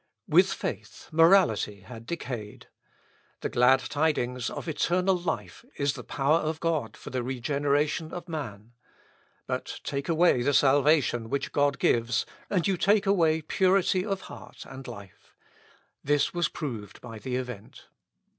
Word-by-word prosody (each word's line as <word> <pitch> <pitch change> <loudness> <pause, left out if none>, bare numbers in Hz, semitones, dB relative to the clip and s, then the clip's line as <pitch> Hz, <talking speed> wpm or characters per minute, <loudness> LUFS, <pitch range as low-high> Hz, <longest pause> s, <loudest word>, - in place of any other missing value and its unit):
With - - +5
faith - - -6
morality 160 - +4
had 115 +3 -11
decayed. 120 -11 -6 0.8
The - - -2
glad 130 +2 +4
tidings 125 -5 -1
of - - -7
eternal 180 +4 +1
life 120 - -4
is 140 -1 +1
the - - -8
power 145 +4 +1
of 155 0 -3
God 155 -10 -1
for - - -10
the 130 0 -1
regeneration 145 +5 -1
of 175 0 -7
man. 120 - -6 0.7
But - - -4
take 140 +3 -4
away 165 -5 +4
the 145 +3 +1
salvation 140 -4 +3
which 140 - -2
God 145 -1 +2
gives, 115 0 +1 0.2
and 185 -3 +1
you 195 -2 +1
take 205 +3 +3
away 165 -5 +2
purity 185 +2 +2
of 195 -2 -3
heart - - -11
and 135 0 -10
life. 100 -2 -12 0.7
This 145 0 +1
was 175 -3 0
proved 110 -9 -6
by 115 -3 -9
the 125 +2 -4
event. 125 -5 -7
145 Hz, 145 wpm, -27 LUFS, 120-165 Hz, 0.8 s, With